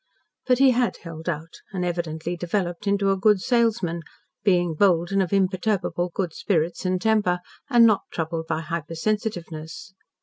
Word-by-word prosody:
But 250 -1 +4
he 270 0 +6
had 245 -1 +1
held 165 0 -6
out, 160 0 -5
and 180 -3 -2
evidently 170 -1 -3
developed 175 +2 -2
into 200 0 +2
a - - +2
good 210 0 +4
salesman, 225 -7 +1 0.4
being 175 -4 +3
bold 175 0 +3
and 195 0 +2
of 185 - -1
imperturbable 185 -2 0
good 180 -5 -2
spirits 170 0 -1
and 185 0 +1
temper, 210 -4 +2 0.3
and 240 -3 +7
not 215 -3 +4
troubled 160 0 -3
by 160 0 -1
hypersensitiveness. 165 +1 -4
180 Hz, 155 wpm, -24 LUFS, 165-205 Hz, 0.4 s, and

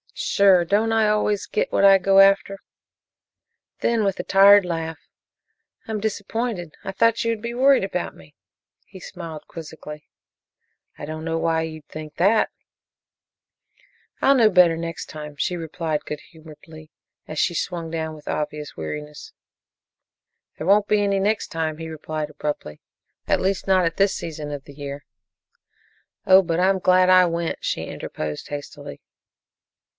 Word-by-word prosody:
"Sure. 190 -3 +3
Don't 210 +5 +1
I 220 -1 +3
always 210 -1 +1
get - - -1
what - - +1
I 195 -1 +8
go 195 +1 +3
after?" 195 0 +4 1.2
Then, 230 -2 +1
with 195 -2 -1
a - - -2
tired 200 0 +6
laugh, 165 -2 -4 0.9
"I'm 220 -1 -3
disappointed; 205 -3 -3
I 195 - -4
thought 230 +3 +2
you 230 - +1
would 225 -2 -4
be 235 +1 -4
worried 265 +2 +4
about - - -3
me." - - -18 0.5
He 190 - -13
smiled 165 -5 -9
quizzically. 150 -2 -10 0.9
"I - - -7
don't 155 +1 -6
know 165 0 -1
why 165 0 0
you'd 155 -2 -8
think 155 -1 -9
that." 205 +5 +3 1.7
"I'll 275 - +5
know 230 -4 +5
better 180 -4 +5
next 165 0 -5
time," 150 -1 -9
she 180 - -1
replied 160 -2 -4
good 150 0 -6
humoredly, 155 0 -14 0.4
as 155 - -7
she 175 - +1
swung 170 -1 -3
down 160 -1 -4
with 150 - -16
obvious 150 0 -4
weariness. 150 - -7 1.2
"There 155 - -5
won't 205 +1 +4
be 210 -1 +2
any 200 -1 +1
next 210 +2 0
time," 160 -1 -3
he 165 0 -7
replied 155 -1 -5
abruptly, 145 - -5 0.5
"at - - +2
least 190 +1 -1
not 185 -2 +3
at 165 0 -2
this 195 0 +2
season 150 -2 -6
of 145 -2 -7
the 140 - -13
year." 140 0 -8 1.2
"Oh, 190 0 +7
but 170 -2 -2
I'm 190 +1 +3
glad 185 0 +4
I 185 0 +7
went," 170 -1 -2
she - - -2
interposed 75 -1 -6
hastily. 145 0 -8
170 Hz, 155 wpm, -23 LUFS, 155-195 Hz, 1.7 s, I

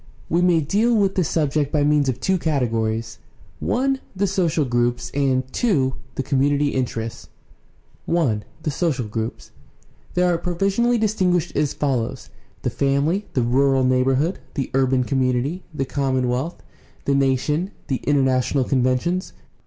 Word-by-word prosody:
We 170 +2 +2
may 175 -2 +4
deal 210 +10 +2
with 200 -3 +2
this 180 -4 0
subject 150 -2 0
by 150 -2 +2
means 145 -2 +3
of 130 -1 -2
two 190 +7 +1
categories: 115 -7 -1 0.4
(i) 270 +2 +1 0.2
the 195 +2 +1
social 175 -6 +1
groups, 120 -1 0
and 135 -2 +1
(2) 145 - +1 0.2
the 135 - -2
com 135 0 0
munity 145 +1 +2
interests. 115 -3 -3 0.8
I. 135 -12 +2 0.2
THE 150 - -1
SOCIAL 135 -7 -1
GROUPS 110 +2 -5 0.6
These 180 - +3
are 175 -2 +2
provisionally 195 +8 +1
distinguished 185 -6 +1
as 150 -1 0
follows: 130 -6 -2 0.3
the - - 0
family, 140 +9 0
the 125 - +2
rural 135 +2 +3
neighborhood, 130 +6 +2 0.2
the 135 -4 -2
urban 130 -1 +2
community, 130 +6 0
the 135 -3 -2
commonwealth, 130 +2 -1 0.4
the 140 - +2
nation, 140 +6 +1 0.2
the 135 - -1
international 135 -1 +1
conventions. 130 +9 0
140 Hz, 140 wpm, -22 LUFS, 130-175 Hz, 0.8 s, may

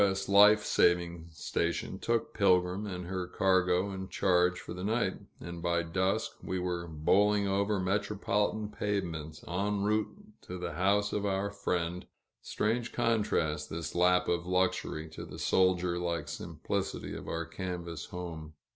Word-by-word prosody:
S. 95 -1 +1
Life 105 +2 +7
Saving 85 -1 +2
Station 85 +3 -2
took 115 +1 0
Pilgrim 90 0 +2
and 90 -2 -5
her 90 0 -3
cargo 95 +1 +2
in 95 0 -6
charge 90 -1 +2
for - - -7
the 90 +1 -6
night, 110 -2 0 0.2
and 85 0 -7
by 85 0 +1
dusk 95 +3 -1
we 95 - -3
were 90 -1 -2
bowling 100 +6 +2
over 100 +1 +1
metropolitan 105 +2 0
pavements 85 -8 -3
en 100 +3 -1
route 105 +1 +2 0.3
to 90 - -7
the 90 - -4
house 100 +3 +2
of 105 - -1
our 100 0 0
friend 90 -3 -2 0.3
strange 115 +3 -1
contrast, 85 -10 0
this 85 0 -4
lap 90 +1 +3
of 85 0 0
luxury, 90 -3 0
to 80 - -9
the - - -9
soldier 90 -2 +2
like 85 -3 -2
simplicity - - -4
of - - -8
our 85 0 -2
canvas 85 -2 -5
home. 80 -3 -7
90 Hz, 145 wpm, -31 LUFS, 85-100 Hz, 0.3 s, Life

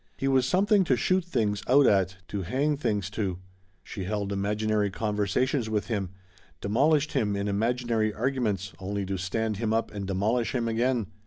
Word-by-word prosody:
He 135 - -1
was 130 -2 +3
something 195 +5 +3
to 130 - +3
shoot 185 +10 +1
things 110 - -1
out 140 +3 +6
at, 95 -3 +2
to 100 - -3
hang 135 - 0
things 105 -8 -1
to. 100 -4 -2 0.5
She 95 - -6
held 100 0 -2
imaginary 105 +1 0
conversations 110 +5 0
with 105 +1 -1
him, 100 -5 -1 0.5
demolished 145 +8 +2
him 105 -2 +1
in 100 +1 -2
imaginary 115 +1 0
arguments 110 -5 -1
only 100 +1 -3
to 95 0 -3
stand 110 +3 -1
him 110 0 -1
up 115 - -1
and 100 -2 -5
demolish 110 +6 0
him 120 -2 0
again. 120 0 +1
110 Hz, 170 wpm, -27 LUFS, 100-125 Hz, 0.5 s, out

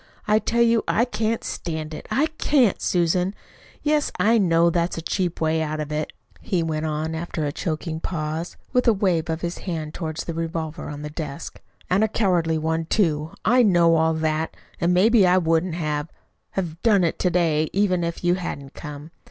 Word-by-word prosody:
I 210 +1 +4
tell 235 +1 +2
you 230 -1 +3
I 235 - +3
can't 225 -2 -1
stand 160 -2 -4
it - - -8
I 285 - +2
CAN'T, 260 -8 +3
Susan. 180 +2 +1 0.5
Yes, 300 0 +1
I 230 +2 +4
know 170 -3 +4
that's 170 0 0
a - - -3
cheap 175 0 -1
way 160 0 +1
out 155 0 -2
of 150 -1 -4
it," 150 0 -2 0.3
he 175 -3 -1
went 160 -1 -2
on, 155 +1 -2
after 160 -1 -3
a 145 - -1
choking 160 +1 -3
pause, 160 0 -4 0.2
with 250 0 +2
a 230 - +6
wave 185 -5 0
of 160 0 -2
his 170 0 -3
hand 160 -4 -4
toward 160 -2 -4
the 170 - -4
revolver 165 0 -4
on 145 0 -7
the 150 - -5
desk;" 150 0 -6 0.3
and 190 +4 +2
a - - +4
cowardly 175 -7 +1
one, 160 +1 -1
too. 160 -5 +1
I 245 +5 +5
know 175 -6 +5
all 160 0 +2
that. 160 0 -1 0.2
And 170 +1 +2
maybe 200 +2 +5
I 180 +1 +5
wouldn't 165 0 +1
have 150 -2 -2 0.4
have 170 -3 -3
done 210 -5 +4
it 165 - 0
to 180 - +2
day, 160 -3 +1
even 185 -3 +1
if 170 +1 -4
you 175 0 +3
hadn't 145 -6 -5
come. 150 0 -8
170 Hz, 195 wpm, -23 LUFS, 160-190 Hz, 0.5 s, a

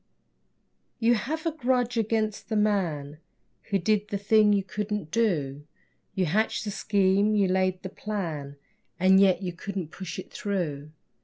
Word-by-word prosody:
You 235 +1 +3
have 310 +8 -2
a 330 - +1
grudge 250 -4 0
against 220 -1 -1
the 220 - -1
man 170 -9 0 0.5
Who 200 - +2
did 210 +3 +1
the 200 - -2
thing 210 +1 +4
you 200 -1 +2
couldn't 210 -3 -4
do. 155 -12 0 0.5
You 185 - +1
hatched 210 +8 0
the 210 - -3
scheme, 200 +1 +2
you 200 -2 +3
laid 185 0 0
the 190 - -4
plan, 165 -10 -4 0.4
And 190 +1 +6
yet 195 0 +4
you 180 -1 -3
couldn't 185 -2 -5
push 180 -2 -7
it 185 - -8
through. 155 -8 -3
200 Hz, 155 wpm, -27 LUFS, 180-215 Hz, 0.5 s, And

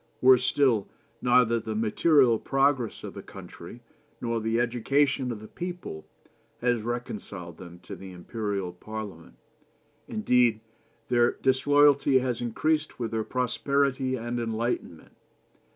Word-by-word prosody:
Worse 130 -1 +6
still, 125 -8 +2 0.3
neither 120 -2 +4
the 110 -1 -5
material 120 +2 +3
progress 135 -3 +1
of - - -7
the - - -8
country, - - -11 0.4
nor 115 -1 -2
the 110 +1 0
education 130 +3 +1
of 115 - -5
the 110 - -11
people, 175 - -7 0.5
has 120 -2 +1
reconciled 105 -7 -5
them 90 -2 -10
to - - -8
the 95 -1 -10
Imperial 100 0 -4
Parliament. 105 -3 -8 0.7
Indeed, 125 - +2 0.5
their 120 -1 +3
disloyalty 140 +1 +4
has 125 -2 -1
increased 155 +6 -1
with 115 -2 -3
their 110 -1 -1
prosperity 130 +2 0
and 120 0 -3
enlightenment. 115 -7 -3
120 Hz, 120 wpm, -27 LUFS, 110-135 Hz, 0.7 s, Worse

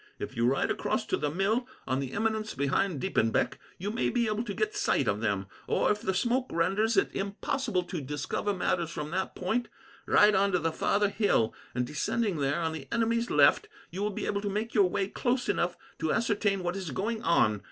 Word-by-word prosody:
If - - -6
you 115 +1 +2
ride 135 +2 +1
across - - -1
to - - 0
the 150 - -1
mill, 205 - 0 0.2
on 130 0 0
the 135 -2 -4
eminence 220 0 -1
behind 140 +4 0
Diepenbeck, 115 -11 +1 0.2
you 200 +4 -3
may 230 - 0
be 240 -1 +1
able 215 0 0
to 205 - -4
get 425 0 -1
sight 415 - +1
of - - 0
them; - - 0 0.2
or, - - +2
if 210 0 -1
the 190 - -1
smoke 245 +6 +1
renders 195 +7 +1
it - - +2
impossible 200 0 -1
to 175 -2 -5
discover 145 +8 -2
matters 180 -3 0
from 150 -2 -5
that 190 +2 -2
point, 230 +7 -1 0.4
ride 210 0 +6
on 195 0 +2
to - - +4
the 165 -1 0
farther 205 +5 +1
hill, 200 - +2 0.2
and, 125 -1 +1
descending 185 - -1
there 145 +3 0
on 160 0 -1
the 150 -4 -7
enemy's 230 0 +1
left, 430 - +4 0.2
you 185 +4 -5
will 210 - +1
be 200 - -4
able 200 0 -1
to 205 - -2
make 215 +4 -2
your 200 -5 +4
way 195 +1 0
close 245 +4 -1
enough 175 -3 0 0.2
to 160 -1 0
ascertain 205 -4 +1
what 175 +1 -1
is 190 -4 -4
going 220 - -2
on. 110 -11 +3
195 Hz, 215 wpm, -29 LUFS, 165-220 Hz, 0.4 s, ride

